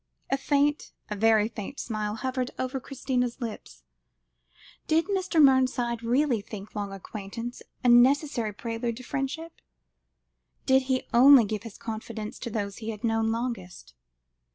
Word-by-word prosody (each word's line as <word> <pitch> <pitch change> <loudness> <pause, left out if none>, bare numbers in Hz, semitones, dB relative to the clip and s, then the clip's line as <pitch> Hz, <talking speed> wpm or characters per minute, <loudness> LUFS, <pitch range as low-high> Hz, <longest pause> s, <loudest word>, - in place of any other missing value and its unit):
A - - +4
faint, 290 +1 +1 0.2
a - - -1
very 215 0 +4
faint, 225 +4 -7
smile 215 -2 -3
hovered 255 +2 -2
over 255 +1 -2
Christina's 255 -2 -2
lips. 230 -4 -7 1.0
Did 325 +1 +3
Mr. 380 -4 0
Mernside 255 -4 +4
really 245 0 +1
think 200 0 -9
long 205 -1 -4
acquaintance 210 +4 -7 0.2
a - - +2
necessary 245 -1 +4
prelude 230 +2 -4
to 255 - -9
friendship? 290 +5 -4 1.0
Did 265 0 +5
he 260 -1 +1
only 255 0 +8
give 210 0 -3
his 225 -2 -10
confidence 220 -1 -6
to - - -5
those 205 -3 -3
he 225 -2 -6
had 215 0 -6
known 225 -1 +1
longest? 225 - -5
235 Hz, 140 wpm, -27 LUFS, 220-265 Hz, 1.0 s, only